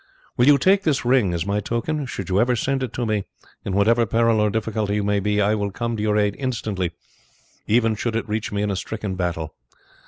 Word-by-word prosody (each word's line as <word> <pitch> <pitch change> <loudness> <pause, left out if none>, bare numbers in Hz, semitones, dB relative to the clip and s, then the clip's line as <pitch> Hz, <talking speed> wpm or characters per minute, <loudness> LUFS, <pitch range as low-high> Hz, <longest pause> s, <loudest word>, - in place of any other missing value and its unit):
Will 125 - +3
you 145 -1 +7
take 190 +8 +3
this 150 -9 0
ring 120 -7 +3
as 85 -1 -2
my 100 +1 0
token? 130 +7 -2
Should 100 -7 -6
you 95 +2 +3
ever 125 +1 +2
send 135 +3 -1
it 130 -4 -3
to 120 - -2
me, 105 -3 -1 0.4
in 95 - -3
whatever 115 +4 +3
peril 115 0 +2
or 105 0 +3
difficulty 110 -1 -1
you 105 - 0
may 105 0 +1
be, 105 +1 0
I 105 +1 +3
will 105 -2 -1
come 115 +3 -3
to 105 - -4
your 105 0 +1
aid 105 -1 +1
instantly, 110 -9 -2 0.8
even 115 0 +3
should 115 +1 -3
it 115 - -2
reach 105 0 -3
me 105 0 -1
in 105 - 0
a - - -1
stricken 105 0 -4
battle. 85 -3 -3
110 Hz, 230 wpm, -22 LUFS, 100-120 Hz, 0.8 s, you